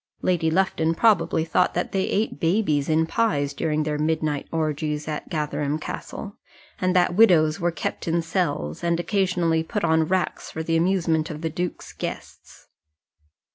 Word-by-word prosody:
Lady 170 Hz, -3 st, +2 dB
Lufton 165 Hz, -2 st, +1 dB
probably 205 Hz, -6 st, +3 dB
thought 160 Hz, -, +1 dB
that 175 Hz, -, -1 dB
they 190 Hz, -1 st, 0 dB
ate 210 Hz, -7 st, -1 dB
babies 165 Hz, -5 st, +1 dB
in 160 Hz, +1 st, +3 dB
pies 145 Hz, -8 st, 0 dB
during 155 Hz, +1 st, 0 dB
their 150 Hz, -1 st, -2 dB
midnight 155 Hz, -2 st, -1 dB
orgies 150 Hz, -1 st, -2 dB
at 150 Hz, -1 st, -4 dB
Gatherum 150 Hz, -1 st, -1 dB
Castle; 200 Hz, +5 st, -7 dB, 0.4 s
and 185 Hz, 0 st, +1 dB
that 180 Hz, 0 st, +3 dB
widows 175 Hz, -7 st, +5 dB
were 175 Hz, -1 st, +1 dB
kept 165 Hz, 0 st, -4 dB
in 170 Hz, 0 st, +1 dB
cells, 160 Hz, -, -2 dB
and 170 Hz, 0 st, +1 dB
occasionally 175 Hz, -4 st, +1 dB
put 205 Hz, +6 st, -3 dB
on 160 Hz, -1 st, +3 dB
racks 185 Hz, +1 st, -1 dB
for 160 Hz, -, -5 dB
the 165 Hz, +1 st, 0 dB
amusement 165 Hz, -2 st, +1 dB
of 155 Hz, -1 st, -6 dB
the 160 Hz, -1 st, -2 dB
duke's 175 Hz, +2 st, -4 dB
guests. -, -, -8 dB
165 Hz, 160 wpm, -24 LUFS, 155-180 Hz, 0.4 s, widows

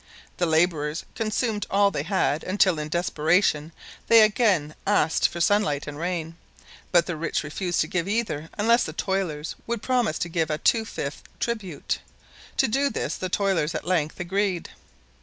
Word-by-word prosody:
The 175 Hz, -, +1 dB
laborers 160 Hz, -1 st, +1 dB
consumed 220 Hz, -1 st, -1 dB
all 200 Hz, 0 st, +3 dB
they -, -, -2 dB
had 155 Hz, -4 st, 0 dB
until, 185 Hz, -3 st, +2 dB
in 150 Hz, 0 st, -4 dB
desperation, 160 Hz, -1 st, +1 dB, 0.4 s
they 230 Hz, -1 st, +8 dB
asked 215 Hz, -, +4 dB
again 185 Hz, -11 st, +2 dB
for 175 Hz, -3 st, +2 dB
sunlight 170 Hz, -6 st, +2 dB
and 150 Hz, -, -6 dB
rain, 165 Hz, -1 st, -3 dB, 0.5 s
but 175 Hz, -2 st, +5 dB
the 175 Hz, -, -3 dB
rich 155 Hz, 0 st, -2 dB
refused 175 Hz, +3 st, -1 dB
to 155 Hz, -, 0 dB
give 180 Hz, +2 st, -1 dB
either 200 Hz, -8 st, -2 dB
unless 230 Hz, +3 st, +4 dB
the 155 Hz, -, -5 dB
toilers 170 Hz, -5 st, -2 dB
would 235 Hz, -2 st, -3 dB
promise 245 Hz, -10 st, +1 dB
to 175 Hz, -, -2 dB
give 165 Hz, -2 st, -1 dB
a 150 Hz, -, 0 dB
two 225 Hz, +7 st, +2 dB
fifths 140 Hz, -9 st, -5 dB, 0.2 s
tribute; 210 Hz, -10 st, -3 dB, 0.6 s
to 265 Hz, -, +4 dB
do 275 Hz, +5 st, +1 dB
this -, -, -3 dB
the 185 Hz, -, -4 dB
toilers 185 Hz, -5 st, 0 dB
at 155 Hz, -, -4 dB
length 165 Hz, -3 st, 0 dB
agreed. 190 Hz, 0 st, -1 dB
180 Hz, 165 wpm, -25 LUFS, 155-205 Hz, 0.6 s, they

